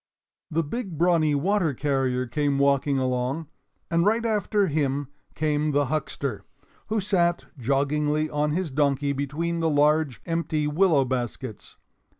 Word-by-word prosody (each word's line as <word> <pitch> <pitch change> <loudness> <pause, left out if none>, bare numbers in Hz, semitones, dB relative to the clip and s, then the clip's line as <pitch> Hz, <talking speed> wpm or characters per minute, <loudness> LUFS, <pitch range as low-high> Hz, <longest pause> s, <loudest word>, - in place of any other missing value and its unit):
The 165 +1 0
big 185 +2 -5
brawny 165 -3 +3
water 170 -1 +1
carrier 135 -2 0
came 140 +3 0
walking 140 0 +2
along, 130 +4 -1 0.4
and 170 0 +3
right 225 +4 +2
after 210 -2 +1
him 145 -4 -1 0.3
came 150 -1 0
the 145 0 +3
huckster, 140 -6 -3 0.4
who 220 +1 0
sat 175 -4 +1
joggingly 150 +4 +1
on 150 0 0
his 175 -2 -2
donkey 140 0 +1
between 150 +5 -2
the 165 -1 +1
large 150 -2 +2
empty 165 -3 -1
willow 150 -2 +3
baskets. 125 -2 -4
150 Hz, 135 wpm, -25 LUFS, 140-165 Hz, 0.4 s, brawny